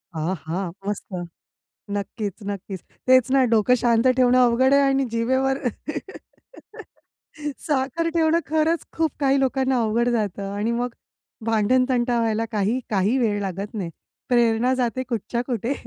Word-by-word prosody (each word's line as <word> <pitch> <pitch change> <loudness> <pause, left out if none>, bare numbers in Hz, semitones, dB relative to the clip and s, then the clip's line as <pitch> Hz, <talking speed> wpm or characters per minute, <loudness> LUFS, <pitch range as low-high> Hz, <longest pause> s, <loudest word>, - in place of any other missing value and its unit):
आहा! 165 +2 -3 0.2
मस्त. 205 -1 -4 0.8
नक्कीच, 205 0 -3
नक्कीच. 195 -1 -5 0.3
तेच 255 -1 +5
ना 270 -1 +5
डोकं 225 +2 +4
शांत 235 0 +3
ठेवणं 255 0 +4
अवघड 250 +2 +4
आहे 280 - +6
आणि 275 0 +2
जिभेवर, 260 +3 +1 2.1
साखर 295 +3 0
ठेवणं 325 0 +3
खरंच 315 +1 +1
खूप 320 -2 0
काही 275 -1 +3
लोकांना 265 -1 +1
अवघड 230 +2 +1
जातं 200 -4 -2
आणि 210 +3 -1
मग 240 +1 -1 0.6
भांडणतंटा 240 +2 +2
व्हायला 225 -1 0
काही, 215 +3 0
काही 205 +4 +2
वेळ 215 -5 +1
लागत 195 +2 -4
नाही. 195 -6 -3 0.4
प्रेरणा 240 0 +3
जाते 255 0 -1
कुठच्या 235 0 -2
कुठे. 240 +1 -1
240 Hz, 130 wpm, -23 LUFS, 210-260 Hz, 2.1 s, आहे